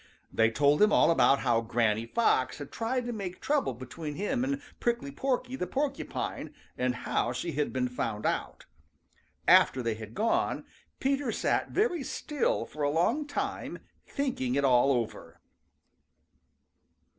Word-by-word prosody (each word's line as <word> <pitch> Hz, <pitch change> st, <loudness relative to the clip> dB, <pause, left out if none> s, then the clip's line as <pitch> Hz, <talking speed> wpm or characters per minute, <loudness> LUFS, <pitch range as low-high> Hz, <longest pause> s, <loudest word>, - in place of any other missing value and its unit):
They 115 Hz, 0 st, +4 dB
told 145 Hz, -, +3 dB
him 210 Hz, 0 st, +6 dB
all -, -, +5 dB
about 140 Hz, -4 st, +4 dB
how 120 Hz, -3 st, +2 dB
Granny 115 Hz, -1 st, 0 dB
Fox 130 Hz, -, +1 dB
had 145 Hz, -2 st, -8 dB
tried 245 Hz, +2 st, -1 dB
to 240 Hz, -, -3 dB
make 190 Hz, -4 st, -5 dB
trouble 280 Hz, -, 0 dB
between 145 Hz, +5 st, -7 dB
him 245 Hz, -, -1 dB
and 275 Hz, +1 st, -1 dB, 0.2 s
Prickly 240 Hz, +3 st, -1 dB
Porky 255 Hz, -2 st, -1 dB
the 180 Hz, -, -3 dB
Porcupine, 275 Hz, 0 st, -3 dB, 0.2 s
and 125 Hz, 0 st, 0 dB
how 120 Hz, -, 0 dB
she 165 Hz, +8 st, -3 dB
had 150 Hz, 0 st, -1 dB
been 130 Hz, -1 st, 0 dB
found 115 Hz, -4 st, -3 dB
out. -, -, -2 dB, 0.8 s
After 130 Hz, -, +6 dB
they 115 Hz, -1 st, 0 dB
had 110 Hz, 0 st, -9 dB
gone, 225 Hz, +2 st, 0 dB, 0.3 s
Peter 275 Hz, -2 st, 0 dB
sat -, -, 0 dB
very 400 Hz, -7 st, +1 dB
still 295 Hz, +1 st, -1 dB
for 150 Hz, -, -9 dB
a 145 Hz, -, +2 dB
long 175 Hz, -, +1 dB
time, 290 Hz, -, -3 dB, 0.3 s
thinking 245 Hz, -, -1 dB
it 140 Hz, 0 st, +2 dB
all 130 Hz, +1 st, +5 dB
over. 120 Hz, -4 st, -3 dB
155 Hz, 150 wpm, -29 LUFS, -, 0.8 s, him